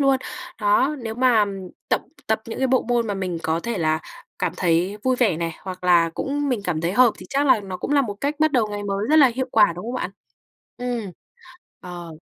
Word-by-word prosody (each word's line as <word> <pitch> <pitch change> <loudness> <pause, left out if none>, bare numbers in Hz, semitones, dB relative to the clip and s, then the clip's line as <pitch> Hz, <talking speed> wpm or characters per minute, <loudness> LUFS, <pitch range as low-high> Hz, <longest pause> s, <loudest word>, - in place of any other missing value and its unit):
luôn. 275 -1 +4 0.4
Đó, 235 +8 +3
nếu 225 -2 -5
mà 245 -3 +4 0.4
tập - - +2 0.3
tập 220 0 +1
những 225 - -6
cái 265 - +2
bộ 260 0 +3
môn 240 -1 0
mà 205 - -2
mình 185 -3 -3
có 160 +1 0
thể 235 +2 -3
là 155 -1 +1 0.4
cảm 180 -2 -1
thấy 180 +3 +1
vui 255 0 +2
vẻ 225 -10 +2
này, 165 0 -2
hoặc 185 -1 -8
là 170 -2 +4
cũng 290 +1 -2
mình 250 -5 0
cảm 165 -4 -1
thấy 170 +2 -1
hợp 245 +1 +5
thì - - -10
chắc 280 +1 +1
là 260 - +5
nó 190 -2 -6
cũng 180 - -5
là 285 -1 +4
một 210 -6 -4
cách 285 +2 0
bắt 310 -1 +3
đầu 240 -4 +3
ngày 205 0 -4
mới 200 +1 -2
rất 310 - +4
là 295 -3 +8
hiệu 260 +1 -1
quả, 210 -7 +5
đúng 180 - -7
không 240 +3 -4
bạn? 220 - -3 0.7
Ừm. 240 -5 -3 0.7
Ờ. 175 -2 -8
215 Hz, 235 wpm, -23 LUFS, 180-255 Hz, 0.7 s, là